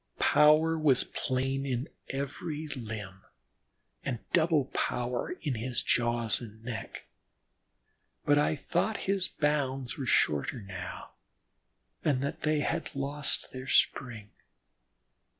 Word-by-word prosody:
Power 155 +2 +5
was 145 -5 +4
plain 135 +1 -1
in 130 0 -1 0.2
every 145 +3 -3
limb, 110 -7 -6 0.8
and 120 - -1 0.2
double 160 -4 +4
power 125 0 -1
in 145 -4 0
his 120 +2 -2
jaws 120 -2 +1
and 110 -1 -10
neck, 115 -4 -6 1.2
but 145 0 +5
I 150 +1 +2
thought 215 +8 -1
his 195 -1 +1
bounds 135 -4 0
were 130 - -3
shorter 75 - +2
now, 95 -2 -7 0.9
and 140 -3 +2
that 140 - -3
they 155 -1 +2
had 165 0 -2
lost 140 +1 -2
their 130 0 -7
spring. 115 -6 +1
135 Hz, 115 wpm, -30 LUFS, 120-150 Hz, 1.2 s, Power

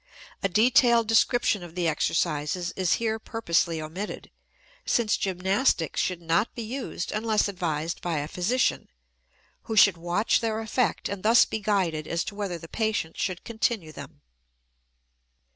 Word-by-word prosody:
A 195 - 0
detailed 230 +3 +4
description 225 -2 +2
of 175 -1 -10
the 175 -2 0
exercises 160 +2 -1
is 185 -3 +1
here 220 -1 -1
purposely 170 -8 0
omitted, 165 +7 -6 0.5
since 230 -3 +1
gymnastics 190 - 0
should 180 -2 -2
not 170 +7 0
be 235 - -4
used 235 -6 -5
unless 215 0 +1
advised 170 -4 -3
by 170 -3 -2
a 145 0 -2
physician, 210 +10 0 0.8
who 220 - -3
should 200 -3 +6
watch 175 +6 +1
their 220 -1 -1
effect 225 +2 -1
and 200 -2 -5
thus 225 +4 +6
be 220 - -4
guided 185 -7 0
as 170 0 -1
to - - -6
whether 200 -4 -4
the 165 - -11
patient 215 -5 -2
should 185 -2 -2
continue 220 -7 -2
them. - - -11
195 Hz, 145 wpm, -26 LUFS, 170-220 Hz, 0.8 s, should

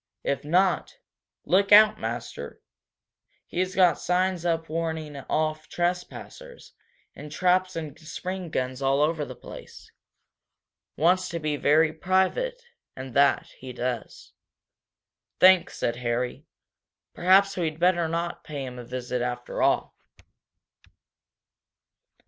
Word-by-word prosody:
"If 140 - -1
not 185 - +1 0.5
look 200 +2 +2
out, 215 +1 +7
master! 115 -10 -6 0.9
He's 185 +1 -2
got 180 -4 +4
signs 180 -1 0
up 165 -1 -1
warning 160 -2 -3
off 155 +3 -2
trespassers, 180 - -5 0.4
and 150 0 -10
traps 185 +3 +1
and 155 -4 -6
spring 180 +3 -6
guns 130 -2 -3
all 135 +1 +2
over 155 0 0
the - - -9
place. - - -12 1.1
Wants 180 +4 +2
to 170 - -4
be 155 -2 -1
very 155 +2 +3
private, 190 - 0 0.4
and 130 -1 -8
that, 140 +1 +3
he 130 -1 -8
does." 125 -1 -5 1.1
"Thanks," 185 -1 +5
said 120 0 -1
Harry. 125 0 -3 0.7
"Perhaps 195 +2 +4
we'd 160 -3 -2
better 175 -1 +3
not 170 +1 -3
pay 145 -3 -6
him 125 -1 -8
a - - -7
visit, 125 0 -4
after 120 0 -4
all." - - +1
160 Hz, 115 wpm, -26 LUFS, 135-185 Hz, 1.1 s, out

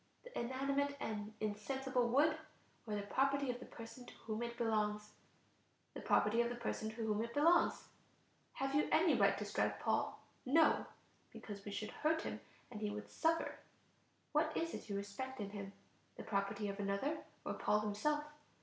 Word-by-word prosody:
the - - -12
inanimate 275 +3 0
and 210 -1 -3
insensible 245 +4 0
wood, 300 +5 +5 0.5
or 210 - -1
the 205 - -2
property 275 +5 +2
of 245 - -6
the - - -9
person 230 +2 -9
to 245 - -12
whom 220 0 -2
it 235 0 -3
belongs? 210 -2 0 0.8
The - - -6
property 220 +3 +4
of 235 - +1
the 245 - -3
person 220 -2 -2
to 220 - -9
whom 220 -1 0
it 235 0 -6
belongs. 330 +4 +5 0.7
Have 270 0 -1
you 295 +1 +3
any 330 +1 +5
right - - +4
to - - -3
strike - - 0
Paul? - - 0 0.2
No, 310 +5 +4 0.4
because 200 -2 -8
we 205 - -5
should 210 +1 -3
hurt 320 +1 +1
him - - -4 0.3
and 215 -3 -6
he 210 - 0
would 210 +1 -6
suffer. 330 0 +1 0.7
What 310 +1 +3
is 330 0 -1
it - - -6
you 200 - -1
respect 235 +7 -4
in 200 -1 -3
him? 200 -1 -6 0.5
the - - -6
property 200 0 -1
of 200 0 -4
another, 200 +10 0 0.3
or - - -1
Paul 210 - +2
himself? 215 +9 0
235 Hz, 175 wpm, -38 LUFS, 210-275 Hz, 0.8 s, wood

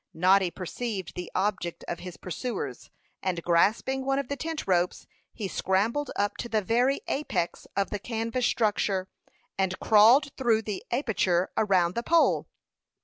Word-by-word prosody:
Noddy 185 +2 +4
perceived 190 +2 -5
the 180 -1 -6
object 185 -3 -1
of 175 - -4
his 180 -1 -8
pursuers, 230 +8 -5 0.3
and 175 -3 -2
grasping 215 +10 +2
one 270 0 +1
of 280 -3 -2
the 280 - -1
tent 320 +1 -4
ropes, 180 -2 +1 0.3
he 210 -4 -5
scrambled 215 +11 0
up 205 0 -1
to 240 - -5
the 215 -2 +1
very 245 +7 +2
apex 270 - -2
of 200 -1 0
the 205 - -2
canvas 230 +3 -1
structure, 200 -4 0 0.5
and 190 -1 0
crawled 235 +7 +5
through 230 -4 +2
the 205 -3 -4
aperture 200 -8 +1
around 185 -5 +2
the 235 - -1
pole. 335 +6 +3
210 Hz, 150 wpm, -27 LUFS, 185-245 Hz, 0.5 s, crawled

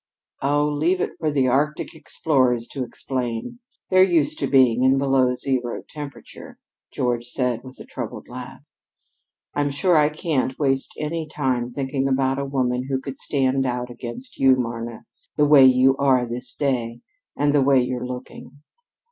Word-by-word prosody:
"Oh, 145 +1 +2
leave 155 +5 +1
it - - -1
for 155 - 0
the 135 -3 +1
Arctic 145 +4 0
explorers 130 -7 0
to 135 - -4
explain. 125 - -4 0.3
They're 185 0 +6
used 175 -6 +3
to - - 0
being 125 -3 +4
in 130 +1 +4
below 135 -2 +2
zero 125 -2 -2
temperature," 145 -2 -10 0.3
George 120 -1 -1
said 125 -2 -1
with 130 0 -12
a - - -9
troubled - - -7
laugh. - - -9 0.9
"I'm 145 0 0
sure 170 +6 +2
I 150 0 +4
can't 150 -5 -1
waste 135 -2 0
any 160 +1 -3
time 130 -5 -1
thinking 135 +1 -2
about 135 0 +1
a 140 - -2
woman 130 -2 -1
who 135 -1 0
could 135 0 -8
stand 135 -1 0
out 125 0 -3
against 120 - -8
you, 135 -1 +6
Marna, 115 -2 -5 0.3
the 150 - +3
way 145 -2 +7
you 130 +1 +5
are 130 -3 +3
this 125 +1 -6
day, 120 -4 -1 0.4
and 145 0 +2
the 145 - +4
way 135 0 +4
you're 125 0 -2
looking." 125 +3 -9
135 Hz, 165 wpm, -23 LUFS, 125-145 Hz, 0.9 s, way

